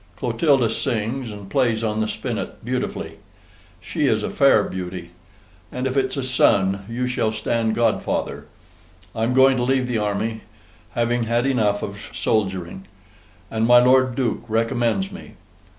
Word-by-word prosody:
Clotilda 140 -8 +2
sings, 120 +1 -2
and 100 -2 -9
plays 115 -1 +1
on 110 0 -1
the 110 - 0
Spinet - - -5
BEAUTIFULLY. - - -3 0.6
She - - -1
is - - +1
a - - -3
fair - - +4
beauty. 90 -2 -6 0.6
And 125 +1 -3
if 130 0 -1
it's 130 0 0
a 135 - -1
son, 100 -6 +2
you 125 +2 -2
shall 115 -3 0
stand 110 +1 -1
GODFATHER. 115 -2 -1 0.7
I'm 115 +3 0
going 130 0 +5
to 120 - 0
leave 130 0 +1
the 120 -3 -1
army, 105 +2 -2 0.5
having 120 0 +1
had 120 +2 +1
ENUF 110 -7 +1
OF 100 0 -7
SOLDERING; 95 -3 -1 0.6
and 110 0 +1
my 120 0 +7
Lord 130 0 +4
Duke 125 -5 -1
RECOMMENDS 115 - 0
me. - - -11
115 Hz, 150 wpm, -22 LUFS, 105-125 Hz, 0.7 s, my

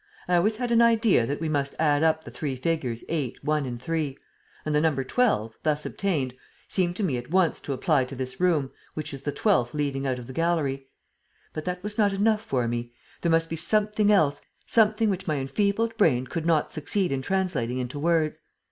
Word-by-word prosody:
I 180 - +2
always 210 +6 +2
had 245 0 -2
an 235 0 +5
idea 225 - +4
that 145 - -2
we 160 - -2
must 140 -2 -1
add 150 -2 +2
up 160 0 +2
the - - -9
three 140 -4 -3
figures 130 -4 -2
8, 145 -7 -3
1 150 -1 +1
and 120 -1 -5
3; 150 0 -2 0.5
and 155 - -1
the 150 - +3
number 150 -4 +1
12, 130 - +1
thus 150 -1 0
obtained, 150 -11 -1 0.3
seemed 180 -2 0
to 210 - -2
me 145 -10 0
at 120 +2 -7
once 180 -1 +2
to - - -5
apply 135 0 +2
to 135 - -8
this 130 0 -5
room, 160 -7 +2 0.2
which 155 -2 -4
is 135 - -6
the 145 - -2
twelfth 125 -1 +1
leading 140 -2 -1
out 130 -1 0
of 125 - -8
the 130 - -9
gallery. 145 -4 0 0.7
But 155 - -5
that 180 0 -3
was 210 +1 -5
not 205 -2 +3
enough 210 +2 +2
for 130 - -1
me. 120 0 -3 0.3
There 170 - +1
must 165 0 +3
be 165 - -4
something 210 +5 +2
else, 145 -8 +3 0.2
something 220 0 +3
which 190 0 -4
my 155 - +1
enfeebled 200 +11 0
brain 130 - +3
could 165 +4 -4
not 160 -3 +2
succeed 180 +4 -1
in 135 -1 -1
translating 175 -8 -1
into 130 +3 -4
words. 160 -1 +1
155 Hz, 210 wpm, -26 LUFS, 135-190 Hz, 0.7 s, an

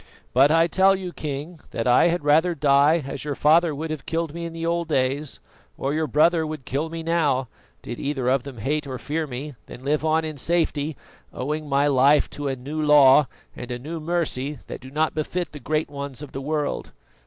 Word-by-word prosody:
But 135 +3 +6
I 165 +1 +5
tell 190 +3 +4
you, 185 -2 -6
King, 150 +3 -5
that 115 - -3
I 125 +6 +5
had 175 -2 0
rather 160 +4 +3
die 145 +2 +4
as 135 - -5
your 145 -1 -3
father 160 +2 +4
would 155 +2 -4
have 155 -3 -6
killed 165 -2 -2
me 170 0 -5
in 170 - -5
the 165 0 -4
old 170 0 0
days, 140 0 -1 0.4
or 135 +1 -2
your 155 0 0
brother 160 +5 +3
would 155 -3 -6
kill 145 +5 -2
me 165 0 -6
now, 145 -7 +1 0.3
did 120 - -6
either 140 -3 -2
of 130 +1 +3
them 135 -1 -10
hate 145 +6 -2
or 130 -1 -4
fear 155 +5 -3
me, 140 +3 -6
than 125 - -11
live 150 +2 0
on 160 0 +2
in 155 -2 -5
safety, 155 -3 0 0.3
owing 150 +3 -4
my 140 +1 +3
life 140 +1 +4
to 145 -1 -5
a 135 - -1
new 145 +5 -5
law 145 -2 +6 0.3
and 125 - -8
a 120 - -3
new 155 +7 -6
mercy 155 -4 -2
that - - -8
do 130 - -10
not 155 +3 0
befit 170 +3 -3
the 150 - -9
great 155 +2 -1
ones 140 -1 -7
of 145 - -9
the 135 - -5
world. 150 +1 -2
150 Hz, 215 wpm, -24 LUFS, 140-160 Hz, 0.4 s, But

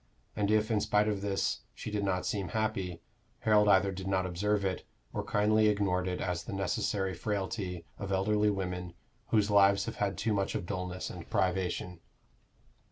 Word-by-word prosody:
And 100 -1 0
if, 110 +1 +2
in 105 -2 +2
spite 105 +1 +2
of 105 -2 -1
this, 100 -1 0 0.2
she 110 - -6
did 105 -1 -1
not 95 -2 0
seem 100 -3 -1
happy, 95 -3 -2 0.4
Harold 105 -1 +4
either 100 0 +5
did 95 0 -6
not 95 -1 +1
observe 100 +3 0
it, 95 -1 -1 0.3
or - - -1
kindly 110 +1 +3
ignored 100 -3 +1
it 90 -1 -2
as 90 -2 -2
the - - -6
necessary 95 0 -1
frailty 95 -1 -3
of 100 -1 -4
elderly 105 +2 +2
women 90 -3 -3 0.3
whose 105 -2 +2
lives 100 -1 +5
have - - -5
had 100 -3 -1
too 110 - 0
much 100 -1 0
of - - -2
dullness 90 -1 -4
and - - -9
privation. 90 -1 -1
100 Hz, 175 wpm, -31 LUFS, 90-105 Hz, 0.4 s, either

